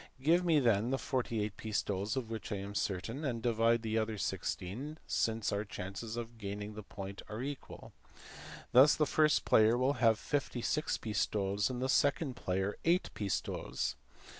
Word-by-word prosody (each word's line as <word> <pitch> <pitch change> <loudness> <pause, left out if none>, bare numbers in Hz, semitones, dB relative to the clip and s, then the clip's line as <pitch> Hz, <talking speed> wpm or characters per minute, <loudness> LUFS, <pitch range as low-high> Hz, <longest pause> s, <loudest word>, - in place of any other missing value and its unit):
Give 165 +6 +3
me 165 -4 +4
then 115 -3 +3
the 135 - +1
48 115 -6 -2
pistoles 105 +1 -2
of 115 -4 -3
which 110 -1 -5
I - - 0
am 100 +1 -5
certain, 105 - -2
and 125 -5 -1
divide 115 0 +2
the 110 0 +1
other 110 0 -2
16 90 0 -2
equally, 150 +3 -6
since 110 -1 0
our 100 +1 0
chances 105 +3 -6
of 115 -1 -6
gaining 105 0 -5
the 105 - -7
point 100 -1 -8
are 110 +4 -4
equal." 140 0 -7 0.8
Thus 130 +5 +7
the 150 - +2
first 155 0 +3
player 110 +2 +5
will 130 +3 +2
have 115 -2 +5
56 145 +3 -1
pistoles 100 -1 0
and 125 0 -3
the - - +1
second 140 0 +2
player 95 0 -1
8 175 +2 +2
pistoles. 100 -2 -2
115 Hz, 165 wpm, -33 LUFS, 105-130 Hz, 0.8 s, Thus